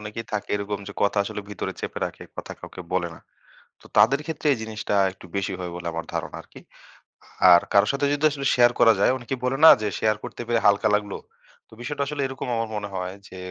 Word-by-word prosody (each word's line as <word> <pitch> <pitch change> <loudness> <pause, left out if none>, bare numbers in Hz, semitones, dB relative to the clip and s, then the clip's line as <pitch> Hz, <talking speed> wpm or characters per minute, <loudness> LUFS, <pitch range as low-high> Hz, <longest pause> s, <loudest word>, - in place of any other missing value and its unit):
অনেকেই 105 +2 -7
থাকে 105 -1 -3
এরকম 100 0 -4
যে - - -7
কথা 100 0 +2
আসলে 105 - -5
ভিতরে 105 - -4
চেপে - - -5
রাখে, - - -10
কথা - - -7
কাউকে 90 - -10
বলে 85 -2 0
না। - - -15 0.6
তো - - -21
তাদের 135 +5 +5
ক্ষেত্রে 160 -1 -3
এই - - -4
জিনিসটা 110 -2 -3 0.2
একটু 95 - -15
বেশি 100 0 -1
হয় 90 -1 -5
বলে 85 -1 -6
আমার 85 - -4
ধারণা - - -4
আরকি। - - -16 0.9
আর 85 - +7
কারো 100 +1 +5
সাথে 140 +1 -1
যদি 145 +1 -3
আসলে 140 -1 -5
শেয়ার 120 -1 +5
করা 115 -1 +7
যায় 100 - +4
অনেকে 125 +2 -4
বলে 125 +1 0
না? - - +12
যে 105 - -1
শেয়ার 110 -1 +2
করতে - - -7
পেরে 120 -1 +2
হালকা 100 +1 +4
লাগল। 105 -1 -2 0.6
তো - - -17
বিষয়টা 140 +3 -2
আসলে 145 0 -3
এরকম 130 -1 -6
আমার 115 -1 -2
মনে 105 -1 -4
হয় 90 0 -3
যে 95 - -12
110 Hz, 220 wpm, -24 LUFS, 100-125 Hz, 0.9 s, না